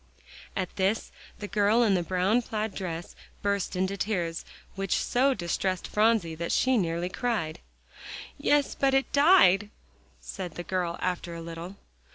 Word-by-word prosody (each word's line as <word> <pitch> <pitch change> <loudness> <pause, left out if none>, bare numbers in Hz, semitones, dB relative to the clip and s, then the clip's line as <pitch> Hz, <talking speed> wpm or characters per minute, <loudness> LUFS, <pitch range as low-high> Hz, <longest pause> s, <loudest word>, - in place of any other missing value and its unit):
At 185 -3 -3
this, 195 +3 0 0.3
the 205 - -6
girl 210 +3 +3
in 210 -4 +3
the 180 - +2
brown 185 +7 +1
plaid 220 -2 -3
dress 175 -3 -5 0.3
burst 200 -1 -1
into 190 +2 -1
tears, 175 -5 -2 0.3
which 195 -1 -1
so 265 +2 +2
distressed 185 0 -2
Phronsie 210 -6 +2
that 170 +1 -4
she 260 0 +3
nearly 170 -4 0
cried. 185 -6 -2 0.8
"Yes, 290 -1 +2
but 270 -1 +2
it 270 - +1
died," 280 - +5 0.5
said 180 -4 -7
the 175 - -5
girl 175 -2 -2
after 180 -1 -2
a 165 - -6
little. 170 +3 -7
190 Hz, 150 wpm, -28 LUFS, 175-220 Hz, 0.8 s, died